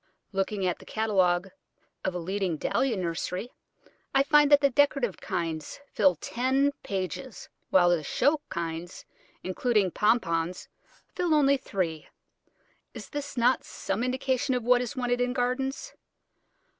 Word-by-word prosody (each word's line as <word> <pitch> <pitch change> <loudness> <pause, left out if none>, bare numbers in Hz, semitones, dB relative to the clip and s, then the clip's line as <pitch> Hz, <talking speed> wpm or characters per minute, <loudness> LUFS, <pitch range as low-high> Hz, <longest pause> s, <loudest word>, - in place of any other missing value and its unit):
Looking 195 0 -1
at 180 - -1
the - - -14
catalogue 190 -4 +1 0.5
of 185 - -2
a - - 0
leading 185 -1 -2
Dahlia 245 - 0
nursery, 180 +5 -3 0.6
I 270 - +6
find 295 0 +5
that 290 - +8
the 280 -1 +3
decorative 275 -6 +2
kinds 160 -3 -4
fill 190 -4 +4
ten 260 - +1
pages, 195 +5 -5 0.2
while 175 -2 +5
the 170 -2 +2
show 290 - +1
kinds, 170 +1 -5 0.4
including 200 0 +1
Pompones, 180 -6 0 0.5
fill 350 -3 +1
only 280 -2 +4
three. 175 - -3 0.9
Is - - -9 0.3
not 245 +2 +4
this - - -19
some 195 +5 -3
indication 260 +1 0
of 245 - -2
what 245 +1 +4
is 250 +2 -4
wanted 245 -1 0
in 245 0 0
gardens? 265 - -2
220 Hz, 135 wpm, -27 LUFS, 180-260 Hz, 0.9 s, that